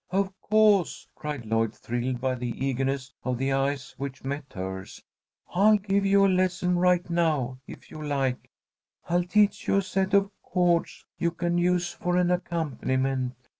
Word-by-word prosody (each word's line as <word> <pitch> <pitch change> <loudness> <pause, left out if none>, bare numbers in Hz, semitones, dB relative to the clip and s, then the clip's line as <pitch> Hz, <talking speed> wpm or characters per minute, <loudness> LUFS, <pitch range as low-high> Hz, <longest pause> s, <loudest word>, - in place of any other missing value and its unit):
"Of 195 +1 0
co'se!" 210 -4 +3
cried 150 -6 -5
Lloyd, 115 0 0
thrilled 120 +1 -3
by 130 0 0
the 125 -1 -4 0.2
eagerness 135 0 -1
of 125 -1 -1
the 135 +2 0
eyes 135 0 -1
which 135 -1 -6
met 140 +1 -5
hers. 95 0 -6 0.5
"I'll 210 +4 +5
give 200 0 0
you 195 0 +5
a - - +5
lesson 180 -1 +1
right 180 0 +3
now, 155 -7 0
if - - -12
you 155 - -8
like. 135 -4 -1 0.6
I'll 175 +1 +2
teach 205 +3 +2
you - - +3
a 195 - +2
set 190 +1 0
of 200 0 +3
chords 175 -2 0
you 170 - +2
can 175 +1 -1
use 175 0 +1
for 180 0 -1
an 180 0 +3
accompaniment. 135 -7 -1
170 Hz, 165 wpm, -27 LUFS, 130-180 Hz, 0.6 s, I'll